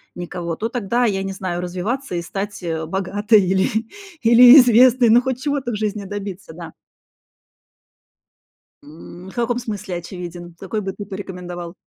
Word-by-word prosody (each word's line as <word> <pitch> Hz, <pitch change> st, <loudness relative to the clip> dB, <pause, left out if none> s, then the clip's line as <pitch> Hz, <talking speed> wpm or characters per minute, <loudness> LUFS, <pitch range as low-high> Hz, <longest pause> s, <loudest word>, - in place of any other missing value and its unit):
никого- 175 Hz, -1 st, -5 dB
то 225 Hz, -, -2 dB
тогда, 240 Hz, +1 st, 0 dB
я 195 Hz, -3 st, 0 dB
не 195 Hz, -, -4 dB
знаю, 180 Hz, -2 st, -4 dB
развиваться 185 Hz, +6 st, -4 dB
и 170 Hz, -, -2 dB
стать, 200 Hz, +4 st, -5 dB
э, 160 Hz, -1 st, -3 dB
богатой 200 Hz, +4 st, +2 dB
или 190 Hz, +1 st, +1 dB, 0.5 s
или 240 Hz, +3 st, +8 dB
известной, 245 Hz, 0 st, +5 dB
ну, 240 Hz, +2 st, +6 dB
хоть 260 Hz, 0 st, -3 dB
чего-то 280 Hz, -4 st, -2 dB
в -, -, -3 dB
жизни 210 Hz, -1 st, -3 dB
добиться, 200 Hz, -2 st, -7 dB
да. 170 Hz, -1 st, -10 dB, 2.1 s
М, 170 Hz, +5 st, -12 dB
в -, -, -14 dB
каком 240 Hz, 0 st, -1 dB
смысле, 205 Hz, -6 st, -5 dB
очевиден? 175 Hz, -1 st, -9 dB
Какой 210 Hz, +2 st, -4 dB
бы 195 Hz, -1 st, -4 dB
ты 205 Hz, -, -8 dB
порекомендовал? 180 Hz, -3 st, -7 dB
195 Hz, 150 wpm, -20 LUFS, 175-230 Hz, 2.1 s, или